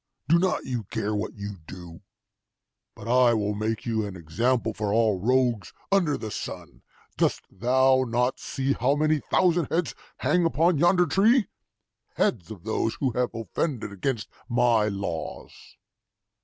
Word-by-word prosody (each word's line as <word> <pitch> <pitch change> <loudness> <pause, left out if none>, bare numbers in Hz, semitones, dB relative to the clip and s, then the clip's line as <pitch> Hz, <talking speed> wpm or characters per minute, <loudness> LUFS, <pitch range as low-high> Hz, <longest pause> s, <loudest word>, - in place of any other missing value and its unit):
Do 170 +2 +5
not 185 +1 0
you 120 -5 -3
care 105 +1 -3
what 105 0 -3
you 100 -1 -6
do? 85 -2 -10 0.9
But - - -10
I 120 -1 +4
will 105 -1 0
make 110 +1 -3
you 110 -2 0
an 100 -2 -6
example 110 +8 0
for 105 -1 -2
all 110 -3 +2
rogues 120 -2 +1 0.2
under 180 -7 +2
the 110 - -6
sun! - - -7 0.4
Dost - - +1
thou 130 +5 +3
not 125 +2 0
see 135 0 -1
how 135 +4 +1
many 155 +1 +2
thousand 175 0 +2
heads 170 0 0 0.2
hang 180 -1 +2
upon 165 0 +2
yonder 175 +2 +4
tree 215 - +3 0.7
heads 90 -8 0
of 100 -6 -9
those 110 +1 -1
who 135 -3 -1
have 125 0 -1
offended 115 - -3
against 110 +3 -2 0.2
my 120 -3 +3
laws? 100 -6 -4
120 Hz, 150 wpm, -26 LUFS, 105-145 Hz, 0.9 s, Do